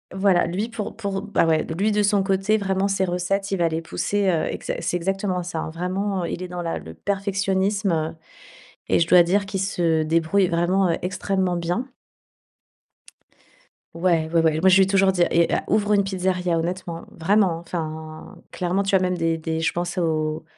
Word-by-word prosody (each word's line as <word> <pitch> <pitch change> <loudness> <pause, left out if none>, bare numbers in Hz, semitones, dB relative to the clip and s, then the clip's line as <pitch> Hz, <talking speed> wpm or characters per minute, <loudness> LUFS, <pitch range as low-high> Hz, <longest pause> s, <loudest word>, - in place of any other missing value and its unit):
Voilà, 190 -2 +3
lui, 200 +7 -2
pour 225 -3 -5
pour 200 -3 -3
bah, 205 -4 +1
ouais, 160 -1 +2
lui 210 +3 +1
de 210 0 +2
son 205 -1 +2
côté, 195 +2 +1
vraiment, 195 -1 0
ses 195 -1 0
recettes, 190 +2 -1
il 195 - 0
va 170 -1 +2
les 160 0 -2
pousser, 200 +4 -1
heu, 165 -3 +1
exa - - -4
c'est - - -2
exactement 185 +1 -1
ça. 170 -2 -4
Vraiment, 185 +2 -2
il 170 - -4
est 185 - -4
dans 180 0 -5
la 165 -1 -3
le 80 - -10
perfectionnisme 195 - -1 0.7
et - - +3
je 165 - +2
dois 180 0 +7
dire 195 +4 +1
qu'il 190 0 -3
se 170 -4 +1
débrouille 165 +4 +2
vraiment, 175 +3 +1
heu, 165 - 0
extrêmement 185 0 -1
bien. 175 +9 -2 2.1
Ouais, 165 -2 +1
ouais, 165 -1 +3
ouais. 160 -1 +2
Moi, 190 +3 +5
lui 190 +1 +6
ai - - 0
toujours 195 0 +3
dit: 180 -2 +2
«Eh, 170 0 +3
heu, - - +2
ouvre 210 -1 +2
une 200 -1 +4
pizzeria, 185 -2 -1
honnêtement, 170 0 -4
vraiment, 190 0 +2
enfin.» 160 -2 -7
Clairement, 185 +2 -1
tu 195 - -2
as - - +5
même 180 -1 0
des 165 -1 0
des 160 0 -3
je 160 - +1
pense 175 +2 -4
aux 155 -3 -1
180 Hz, 190 wpm, -23 LUFS, 165-195 Hz, 2.1 s, dois